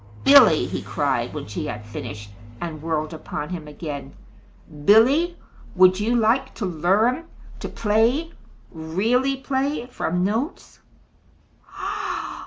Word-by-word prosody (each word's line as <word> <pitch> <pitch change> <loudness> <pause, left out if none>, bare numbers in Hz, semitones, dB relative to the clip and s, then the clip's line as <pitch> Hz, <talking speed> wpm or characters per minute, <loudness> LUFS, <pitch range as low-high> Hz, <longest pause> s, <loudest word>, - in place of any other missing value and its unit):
"Billy," - - +7
he - - -4
cried, - - -1
when - - -6
she - - -5
had 105 0 -6
finished 105 -1 -8 0.3
and 160 -3 -6
whirled 155 -1 -2
upon 150 -1 -6
him 165 -4 -6
again, 145 -2 -7 0.7
"Billy, 275 - +5 0.4
would 185 0 +5
you 225 +4 +1
like 240 +4 +1
to 210 - -3
learn 195 - +1 0.3
to - - -5
play 230 +10 +1 0.4
really 220 +12 0
play 270 0 -2
from 180 -8 -2
notes?" 225 - -3
205 Hz, 115 wpm, -23 LUFS, 160-250 Hz, 0.7 s, Billy